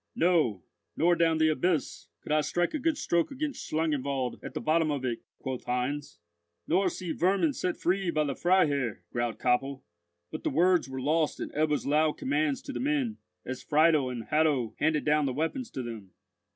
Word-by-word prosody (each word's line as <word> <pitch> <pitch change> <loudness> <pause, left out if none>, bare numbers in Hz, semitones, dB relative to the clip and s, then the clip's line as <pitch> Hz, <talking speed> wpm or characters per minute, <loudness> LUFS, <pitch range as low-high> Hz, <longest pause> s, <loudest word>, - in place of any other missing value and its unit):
"No; 160 - +2 0.3
nor 175 +2 +4
down 165 -1 +2
the 160 0 +4
abyss, 170 +1 -1
could - - -7
I 155 0 +4
strike 175 +4 0
a 305 - -1
good 310 +2 0
stroke 170 - +1
against 285 +1 -4
Schlangenwald 140 -5 -1
at - - -8
the - - -1
bottom 160 0 +2
of 140 -3 -2
it," 120 -2 -2 0.2
quoth 130 -1 -5
Heinz. 125 +4 -2 0.5
"Nor 185 +3 +3
see 180 -1 -5
vermin 195 - +2
set 180 -8 -2
free 185 +1 0
by 155 -2 +1
the 140 -2 -1
Freiherr," 145 - +1
growled 120 -1 -2
Koppel; 130 +2 0 0.5
but - - -6
the - - +1
words 175 +1 +3
were 130 0 -5
lost 155 +3 +1
in - - -5
Ebbo's 150 0 0
loud 150 +2 +2
commands 145 +1 0
to 280 - -6
the - - -4
men, 270 -5 0 0.3
as 130 0 -5
Friedel 150 -1 +3
and 120 -2 -5
Hatto 145 -5 +1
handed 155 0 +1
down 150 -1 +3
the 130 - -1
weapons 165 - -2
to 130 - -5
them. 110 -5 -7
155 Hz, 190 wpm, -29 LUFS, 135-175 Hz, 0.5 s, nor